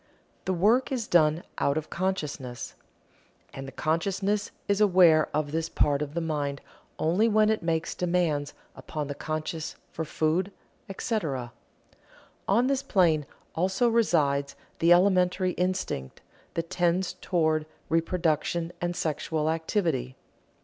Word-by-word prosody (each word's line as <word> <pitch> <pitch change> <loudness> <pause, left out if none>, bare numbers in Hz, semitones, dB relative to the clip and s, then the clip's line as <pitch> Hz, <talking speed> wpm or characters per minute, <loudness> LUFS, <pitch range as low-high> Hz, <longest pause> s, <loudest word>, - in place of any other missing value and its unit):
The 190 - 0
work 220 +10 +3
is 245 -4 -1
done 160 -2 +3 0.2
out 140 +2 +1
of 155 0 -4
consciousness, 150 -9 -3 0.8
and 135 0 -7
the - - -7
consciousness 195 +8 -1 0.2
is 200 +1 +1
aware 175 -6 +5
of 150 -1 -1
this 160 +1 -1
part 145 -1 +1
of 150 +1 -4
the 170 - 0
mind 145 -3 -2 0.4
only 180 +8 +2
when 215 -1 +4
it 220 - 0
makes 165 -1 -1
demands 170 -5 0 0.2
upon 150 -2 -5
the - - -2
conscious 155 +2 -4 0.2
for 160 - -3
food, 160 +5 0 0.4
etc. 155 - -2 1.0
On 225 +6 +3
this 270 0 +1
plane 165 - +2 0.3
also 190 +8 +1
resides 145 -11 +2 0.2
the 170 +1 +4
elementary 185 0 +4
instinct 180 - -2 0.3
that 165 +1 -3
tends 180 0 +1
toward 155 -3 +1 0.2
reproduction 165 0 0
and 175 0 -1
sexual 155 0 -1
activity. 160 - -1
165 Hz, 130 wpm, -27 LUFS, 155-185 Hz, 1.0 s, aware